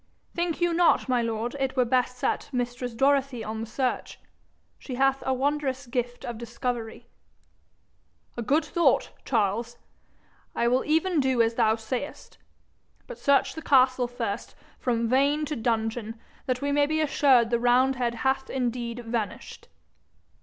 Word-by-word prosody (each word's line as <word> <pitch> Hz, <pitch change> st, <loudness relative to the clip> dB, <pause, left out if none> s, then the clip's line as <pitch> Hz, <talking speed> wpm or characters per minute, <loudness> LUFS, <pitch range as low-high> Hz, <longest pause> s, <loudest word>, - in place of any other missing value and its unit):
'Think 345 Hz, -1 st, -1 dB
you 345 Hz, -1 st, +2 dB
not, 345 Hz, -3 st, +3 dB
my 250 Hz, -2 st, +2 dB
lord, 230 Hz, +2 st, -2 dB
it 270 Hz, 0 st, -2 dB
were 250 Hz, -, +4 dB
best 250 Hz, +1 st, +1 dB
set -, -, -1 dB
mistress 245 Hz, -1 st, -3 dB
Dorothy 270 Hz, -2 st, +2 dB
on 220 Hz, +1 st, -4 dB
the 225 Hz, -, -5 dB
search? 250 Hz, +2 st, -2 dB, 0.6 s
She 255 Hz, -, -6 dB
hath 270 Hz, +1 st, +2 dB
a -, -, +2 dB
wondrous 270 Hz, 0 st, -1 dB
gift 245 Hz, 0 st, -3 dB
of 235 Hz, -2 st, -5 dB
discovery.' 235 Hz, -1 st, -4 dB, 1.3 s
'A 240 Hz, -, -4 dB
good 295 Hz, +7 st, +1 dB
thought, 340 Hz, +3 st, +2 dB
Charles! 230 Hz, +1 st, 0 dB, 0.8 s
I 235 Hz, -, +1 dB
will 250 Hz, +2 st, +2 dB
even 325 Hz, +2 st, +2 dB
do 260 Hz, -3 st, +1 dB
as 225 Hz, 0 st, 0 dB
thou 225 Hz, -2 st, +3 dB
sayest. 240 Hz, +5 st, -6 dB, 0.7 s
But -, -, -10 dB
search 280 Hz, -1 st, +3 dB
the 320 Hz, -, -7 dB
castle 255 Hz, -3 st, +4 dB
first, 235 Hz, -4 st, -5 dB, 0.2 s
from 235 Hz, -2 st, 0 dB
vane 280 Hz, +5 st, +2 dB
to 300 Hz, +1 st, -3 dB
dungeon, 225 Hz, -1 st, -2 dB, 0.3 s
that 255 Hz, +1 st, -1 dB
we 285 Hz, -, 0 dB
may 285 Hz, 0 st, +3 dB
be 315 Hz, +1 st, 0 dB
assured 270 Hz, -6 st, +3 dB
the 235 Hz, -, +2 dB
roundhead 245 Hz, 0 st, +2 dB
hath 265 Hz, +2 st, -1 dB
indeed 240 Hz, -2 st, -3 dB
vanished.' 225 Hz, -2 st, -4 dB
250 Hz, 150 wpm, -26 LUFS, 235-275 Hz, 1.3 s, were